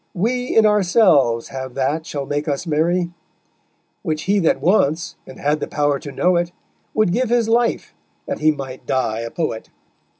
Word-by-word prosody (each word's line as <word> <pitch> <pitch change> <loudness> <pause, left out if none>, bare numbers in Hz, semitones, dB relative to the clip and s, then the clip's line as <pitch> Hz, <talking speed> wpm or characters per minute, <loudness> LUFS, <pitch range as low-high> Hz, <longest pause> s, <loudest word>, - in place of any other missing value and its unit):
We 245 +7 -1
in 220 - +7
ourselves 180 - +3
have 130 -1 -6
that 145 +4 -1
shall 140 -2 -4
make 145 +3 -2
us 145 +2 -2
merry; 170 +3 +1 0.9
Which 155 -1 -2
he 200 +1 +2
that 165 - +2
wants 165 -4 +1
and 130 - -11
had 150 +2 +1
the - - -3
power 145 -1 0
to 145 - -8
know 180 +4 +2
it, 175 0 -1 0.4
Would 215 -5 +3
give 250 +1 0
his 235 -2 +2
life 235 +1 +1 0.3
that - - -4
he 155 - +4
might 135 -4 -4
die 115 -4 0
a 115 0 -4
poet_. 135 -6 -3
160 Hz, 175 wpm, -20 LUFS, 140-195 Hz, 0.9 s, in